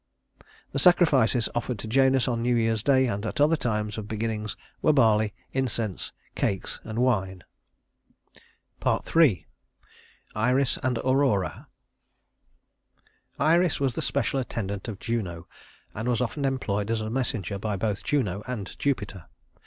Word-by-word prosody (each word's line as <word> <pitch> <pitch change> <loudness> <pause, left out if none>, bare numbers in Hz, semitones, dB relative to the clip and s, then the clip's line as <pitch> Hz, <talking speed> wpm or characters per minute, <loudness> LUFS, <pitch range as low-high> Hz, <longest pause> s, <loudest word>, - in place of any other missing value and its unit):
The - - -1
sacrifices 140 -10 +4
offered 120 0 -2
to 110 - -7
Janus 130 +2 +3
on 120 -2 0
New 120 +1 +2
Year's 115 -2 +1
day 130 +1 +4
and 100 -4 -2
at 115 +7 -4
other 150 +3 +5
times 105 -6 -2
of 105 - -7
beginnings 110 -1 -3 0.2
were 155 - +4
barley, 110 -5 +3 0.2
incense, 120 -6 -2 0.2
cakes, 95 -2 -2
and 110 0 -6
wine. 95 -7 +1 1.4
III. 155 - +3 0.9
Iris 125 +5 +1
and 125 -1 0
Aurora 130 -7 +1 1.7
Iris 165 +4 +3
was 135 -3 +1
the - - -3
special 135 - 0
attendant 100 -6 -4
of 110 -4 -5
Juno, 95 -8 -3 0.5
and 110 +4 -3
was 120 -2 +1
often 140 +4 -1
employed 110 -6 -1
as 115 -1 0
a 110 0 -4
messenger 110 -6 -2
by 105 0 -2
both 100 +1 -2
Juno 105 -10 0
and 110 -7 -5
Jupiter. 105 - -2
115 Hz, 135 wpm, -26 LUFS, 105-130 Hz, 1.7 s, other